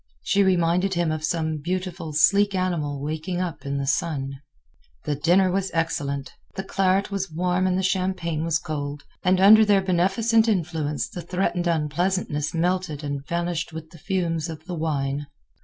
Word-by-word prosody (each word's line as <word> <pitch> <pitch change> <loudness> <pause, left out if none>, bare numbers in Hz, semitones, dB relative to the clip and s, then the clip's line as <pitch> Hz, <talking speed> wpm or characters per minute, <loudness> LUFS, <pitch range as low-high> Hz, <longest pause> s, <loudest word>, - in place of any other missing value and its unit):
She 200 - +2
reminded 180 0 +2
him 170 -2 +1
of 155 0 -3
some 160 -1 -1
beautiful, 180 0 -4
sleek 200 +6 +4
animal 165 -6 -1
waking 160 +4 -3
up 175 -5 -4
in 140 0 -1
the 140 - -2
sun. 135 -2 -1 0.6
The 150 - 0
dinner 175 +6 +3
was 195 +1 0
excellent. 140 -4 -2 0.2
The 190 - -3
claret 195 +1 +1
was 195 -1 -2
warm 180 +3 +1
and 185 0 +1
the 190 - -1
champagne 185 -4 -1
was 165 -1 +1
cold, 145 -3 -5 0.2
and 185 0 +3
under 215 +3 +8
their 205 -2 +3
beneficent 195 +5 +2
influence 160 -7 -1
the 175 - -7
threatened 180 0 -1
unpleasantness 160 -1 0
melted 175 -3 -1
and 140 -1 -3
vanished 170 -1 -2
with 160 0 -8
the 170 - -14
fumes 170 -3 -1
of 160 -1 -8
the 180 - -5
wine. 145 -3 -2
170 Hz, 165 wpm, -24 LUFS, 155-185 Hz, 0.6 s, under